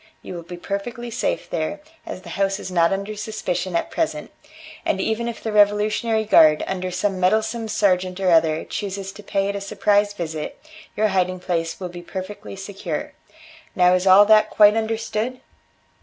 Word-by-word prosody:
You - - -7
will 175 - -6
be 175 +1 -9
perfectly 235 +6 -5
safe 235 - -2
there, 165 - -3 0.3
as 185 - -7
the - - -10
house 195 0 -1
is 185 - -7
not 170 -2 +3
under 200 +2 -3
suspicion 195 -4 -3
at - - -1
present, 150 -1 -2 0.5
and 190 - 0
even 220 +4 -1
if 235 - -6
the 220 - -2
revolutionary 210 +2 +2
guard, 155 -7 +6
under 185 -1 -3
some 185 +1 -1
meddle 200 +4 +3
some 225 0 -4
sergeant 185 -4 +1
or 185 -2 +2
other, 160 -1 +3
chooses 195 -1 -5
to 210 - -12
pay 195 -1 -1
it 200 - -2
a 200 - -4
surprise 205 +1 +1
visit, 160 -5 -5 0.4
your 215 0 +2
hiding 185 -1 0
place 165 -2 -2
will 180 -2 -5
be 175 0 -9
perfectly 190 +3 -7
secure. 190 -5 -5 0.6
Now 180 0 +5
is 185 +1 +1
all 190 +2 +8
that 215 0 +5
quite 210 0 +6
understood?" 225 +2 -2
195 Hz, 180 wpm, -22 LUFS, 180-215 Hz, 0.6 s, all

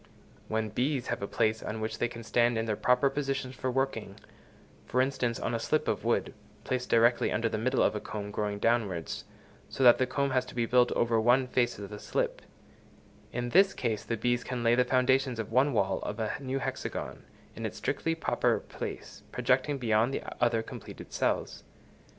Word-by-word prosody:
When 110 0 -1
bees 130 +4 -1
have - - -2
a 100 - -2
place 110 0 +1
on 110 - -4
which 110 0 -3
they 120 - +2
can 115 -1 -9
stand 120 +1 +2
in 115 - 0
their 110 -2 0
proper 125 +5 +3
positions 135 -2 -2
for 130 - -2
working—for 125 -1 -5
instance, 130 -3 0
on 115 - -2
a 115 - 0
slip 155 +7 0
of - - -1
wood, - - 0 0.3
placed 125 -1 -2
directly 120 +1 +4
under 115 +2 +1
the 110 -1 -2
middle 130 +4 +2
of - - +3
a 105 - -2
comb 105 -1 -6
growing 105 -1 -2
downwards, 100 -7 0 0.4
so 135 - -2
that 120 -1 +8
the 130 - +2
comb 140 -1 0
has 130 -1 +2
to - - -11
be 120 -1 +1
built 125 +1 +4
over 115 -1 +2
one 125 +3 +4
face 125 -1 0
of 100 0 -8
the 105 - -7
slip—in 120 +3 -6
this 195 +6 +5
case 110 -2 -1
the 115 - -2
bees 120 +2 0
can 125 -2 -4
lay 115 0 +4
the 125 +1 +4
foundations 130 0 +2
of 115 -1 -4
one 130 +5 +4
wall 95 -5 +1
of 105 - -5
a 110 -1 -1
new 135 -1 -3
hexagon, 135 - -4 0.3
in - - -7
its - - -4
strictly 165 0 -1
proper 165 - +1
place, - - -7
projecting 130 +3 +1
beyond 115 -1 +2
the - - -4 0.2
other 115 -2 +2
completed - - -10
cells. - - -1
120 Hz, 195 wpm, -29 LUFS, 110-130 Hz, 0.4 s, that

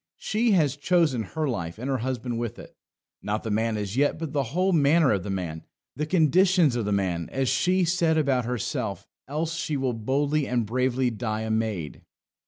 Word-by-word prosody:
She 220 +1 +1
has 150 -7 +3
chosen 150 -5 +2
her 155 +9 -3
life, 85 -9 -3
and 125 +4 -5
her 135 -2 0
husband 125 -1 -3
with 120 -2 -4
it. - - -12 0.5
Not 105 +1 -2
the 110 - -3
man 110 +1 0
as 105 0 -4
yet, 145 +2 +2
but 160 -2 -5
the 140 -2 +1
whole 185 +1 +3
manner 155 0 +4
of 100 -3 +1
the 100 - -6
man. 85 -5 -4 0.3
The 150 +1 -2
conditions 175 -2 +4
of 120 -3 -1
the 105 - -1
man, 90 -4 -1
as 135 -2 0
she 180 +7 +2
said 165 -2 +2
about 135 -5 +1
herself; 125 -3 -3 0.2
else 155 +4 -2
she 155 -3 -2
will 130 -2 0
boldly 140 +6 0
and 120 -2 0
bravely 125 +2 0
die 110 -1 -3
a 110 0 -3
maid. 110 -8 -2
130 Hz, 195 wpm, -26 LUFS, 110-155 Hz, 0.5 s, manner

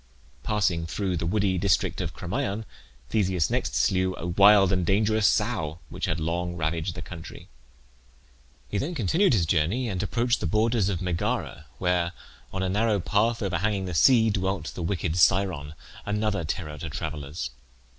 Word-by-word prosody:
Passing 95 -6 0
through 95 +1 -2
the 85 - -2
woody 95 -1 +1
district 95 -2 +1
of - - -4
Crommyon 100 +3 -3 0.5
Theseus 95 -7 +1
next - - -1
slew 95 -1 +1
a 85 - -6
wild 100 +2 +6
and 90 -2 +1
dangerous 105 +3 +2
sow 80 0 0
which - - -3
had - - -1
long 85 +2 -2
ravaged 80 +1 -2
the 80 - -6
country. 85 0 -10 1.2
He 100 - -2
then 170 - -3
continued 160 - +2
his 90 -7 +2
journey 85 +11 +1
and 95 -3 -2
approached 120 +3 0
the - - -2
borders 110 -1 +2
of 95 -2 -2
Megara, 85 -4 -2
where, 90 -1 0 0.4
on 95 0 -2
a - - 0
narrow 105 +1 +1
path 110 +5 +1
overhanging 100 +1 -1
the 90 - -4
sea, 115 - +5
dwelt 95 -6 -2
the - - -6
wicked 85 -1 -1
Scyron, 90 -5 +2 0.3
another 105 -3 -1
terror 75 -1 -4
to 80 - -5
travellers. 75 -3 -5
95 Hz, 160 wpm, -26 LUFS, 85-105 Hz, 1.2 s, wild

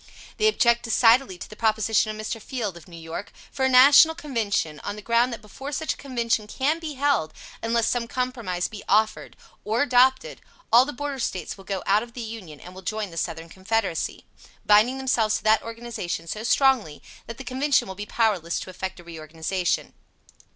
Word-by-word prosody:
They 430 - +3
object 235 - +3
decidedly 230 -2 +3
to - - -8
the 215 - -12
proposition 220 0 +1
of 215 0 -5
Mr. 225 0 -4
Field, 215 -6 -4
of 170 - -13
New 170 -2 -11
York, 165 +4 -7 0.2
for 265 - -1
a - - +3
National 280 +5 +7
Convention, 220 - -2
on - - -5
the 210 - -9
ground 235 +2 +2
that 230 -2 -7
before 270 +7 -8
such 315 +2 -2
a - - -16
Convention 235 -5 -1
can 290 +8 0
be 315 -3 -6
held, 275 - 0 0.3
unless 230 0 +1
some 240 -1 -1
compromise 235 -8 -2
be 210 -2 -9
offered, 215 +2 +1 0.3
or 225 +5 +1
adopted, 260 0 +2 0.3
all 245 +2 +8
the 295 - -4
Border 285 0 -5
States 185 -8 -3
will 195 - -15
go 195 -2 -3
out 205 +2 +3
of 235 0 -10
the 245 - -6
Union 215 -10 -8
and 180 - -12
will 190 - -10
join 210 0 -3
the - - -11
Southern 165 0 -4
Confederacy, 190 0 -2 0.4
binding 215 +5 +5
themselves 230 -5 +1
to - - -11
that 215 0 +4
organization 230 -7 -5
so 210 +6 -5
strongly 240 - +2 0.2
that 230 - -7
the 270 - -8
Convention 265 +1 +1
will 190 - -6
be 205 +2 -7
powerless 200 -8 0
to 185 - -8
effect 190 0 -6
a - - -12
reorganization. 165 +2 -3
225 Hz, 195 wpm, -24 LUFS, 190-255 Hz, 0.4 s, all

